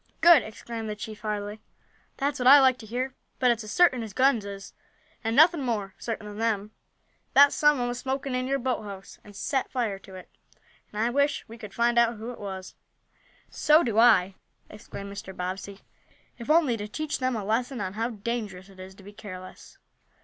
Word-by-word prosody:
"Good!" 335 -4 +7
exclaimed 225 0 -7
the 210 - -3
chief 215 0 -8
heartily; 210 0 -4 0.6
"That's 280 0 -1
what 250 - +1
I 285 +2 +10
like 260 -2 +4
to 220 - -11
hear. 250 +4 -3 0.2
But 250 -2 +4
it's 235 -1 -2
as 210 - -8
certain 310 -9 +4
as 220 -3 -7
guns 255 -4 +3
is, 200 -1 -8 0.5
and 225 0 -1
nothing 320 +2 +6
more 215 -6 -2
certain 225 -2 -5
than 210 0 -8
them, 215 -2 -1 0.6
that 285 +1 +8
some 295 -1 +4
one 245 -1 -1
was 245 0 -4
smoking 270 +1 -3
in 255 0 -1
your 275 +1 +1
boathouse, 210 -7 -5
and 205 -1 -15
set 265 +6 -1
fire 225 -7 -2
to 190 -1 -13
it. 185 - -11 0.6
And 210 - -6
I 235 - +1
wish 280 +2 +1
we 225 - -10
could 210 -3 -10
find 235 0 +3
out 235 0 +3
who 225 +3 -7
it 245 - -11
was." 190 -2 -7 0.8
"So 310 +2 +4
do 225 -2 +1
I!" 200 -5 +5 0.4
exclaimed 200 -1 -9
Mr. 200 -2 -9
Bobbsey. 190 +2 -5 0.6
"If 235 - -8
only 305 -7 +4
to 205 0 -5
teach 305 +7 -4
them 255 -1 0
a 215 - -3
lesson 240 +4 -1
on 190 -2 -3
how 225 +3 -2
dangerous 210 -4 -5
it 190 -1 -17
is 190 +1 -10
to 195 - -16
be 205 +2 -12
careless. 185 -3 -11
225 Hz, 200 wpm, -27 LUFS, 205-255 Hz, 0.8 s, I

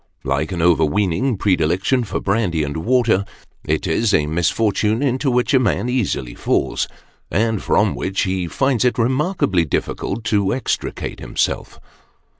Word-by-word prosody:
Like 70 +5 -1
an 85 -3 -2
over 85 -2 +4
weening 100 - 0
predilection 95 +7 +1
for 105 - -3
brandy 95 -6 0
and 70 0 -4
water, 115 +2 +2 0.4
it 80 +6 -1
is 100 +5 +2
a 75 - +2
misfortune 105 - +1
into 135 +1 +1
which 125 +3 +1
a 130 - +6
man 120 +1 0
easily 95 - -1
falls, - - 0 0.4
and 110 +1 0
from 105 -1 +2
which 95 +1 -2
he 95 -2 -1
finds 135 - +1
it 125 - +1
remarkably 130 - +1
difficult 95 - -3
to 105 -1 +1
extricate 130 - -3
himself. - - -2
100 Hz, 145 wpm, -20 LUFS, 85-120 Hz, 0.4 s, a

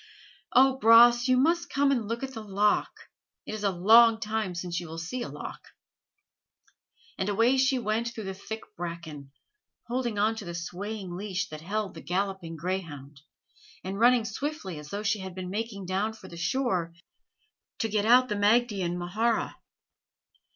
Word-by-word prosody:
"O, 265 +1 +5
Bras, 240 +1 +7
you 255 0 +4
must 335 +6 +2
come 280 0 +2
and 240 -6 0
look 230 +3 -3
at 265 0 -5
the 225 - -6
loch. 205 0 +1 0.5
It - - -6
is 215 -1 -5
a 200 - +3
long 220 +5 +6
time 215 -4 -2
since 175 -1 -3
you 175 - -8
will 160 +1 -8
see 180 +10 -4
a - - -4
loch." - - -8 1.6
And 190 - 0
away 230 +6 +3
she 260 0 +3
went 230 0 -1
through 225 -2 -7
the 190 -1 -4
thick 220 +3 -7
bracken, 165 -5 -7 0.5
holding 240 -2 -2
on 215 +2 +2
to 210 - -7
the 170 0 -6
swaying 185 +2 -5
leash 195 0 -3
that 155 0 -8
held 200 +3 -3
the 160 - -10
galloping 190 -2 -3
greyhound, 155 -5 -5 0.6
and 195 +2 -5
running 240 -1 +5
swiftly 220 - -4
as 150 0 -11
though 205 +4 -4
she 210 0 +1
had 190 -2 -7
been 185 -1 -6
making 205 -2 -4
down 195 +4 -1
for 205 -4 -13
the 170 - -11
shore 180 -4 -1 0.8
to 225 - -1
get 210 -1 0
out 250 +2 +6
the 225 - -2
Maighdean 205 -4 +2
mhara. 215 +6 0
205 Hz, 170 wpm, -28 LUFS, 180-235 Hz, 1.6 s, Bras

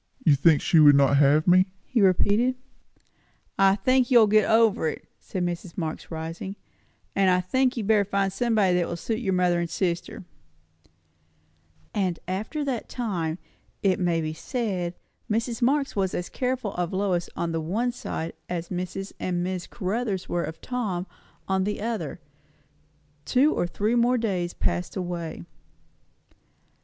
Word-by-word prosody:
"You 155 - +6
think 150 +2 +4
she 165 - +4
would 145 -2 +8
not 140 0 +4
have 145 +3 +4
me?" 185 +2 +6 0.2
he 240 - 0
repeated. 205 +6 +3 1.0
"I 195 0 +5
think 255 +5 +2
you 250 - +6
will 225 - +8
get 215 +1 +3
over 220 -7 +4
it," - - -5
said 180 -2 -3
Mrs. 175 0 -5
Marx, 160 -3 -4
rising. 165 +4 -5 0.6
"And 195 -1 +4
I 180 0 +4
think 255 +8 +1
you 230 - -1
had - - -5
better 210 -2 +4
find 195 -1 0
somebody 215 -5 +2
that 175 -1 +1
will 170 - -3
suit 220 +5 -3
your 195 -6 -1
mother 180 -1 +2
and 170 -1 -2
sister." 180 +4 -2 1.7
And 185 -4 0
after 220 - -3
that 255 -5 -3
time, 180 -10 -2 0.5
it 190 -2 +2
may 170 -2 +1
be 155 0 -3
said, 185 -3 -3 0.3
Mrs. 230 +2 -1
Marx 275 +3 +1
was 190 -2 0
as 175 - -3
careful 250 -5 -2
of 175 -1 -2
Lois 185 -3 0
on 170 - -2
the 165 0 -1
one 220 +10 -1
side 165 -8 -5 0.2
as 170 -1 -4
Mrs. 185 +2 -4
and 175 -1 -1
Miss 185 -1 -3
Caruthers 200 -1 -3
were 175 -1 -1
of 160 0 -8
Tom 210 -8 -3 0.4
on 190 0 +1
the 210 +2 -2
other. 215 -8 -3 1.0
Two 275 - +3
or 175 - 0
three 210 +6 -1
more 240 +1 +3
days 185 -7 -2
passed 175 - -2
away. 175 - -4
190 Hz, 160 wpm, -25 LUFS, 175-225 Hz, 1.7 s, would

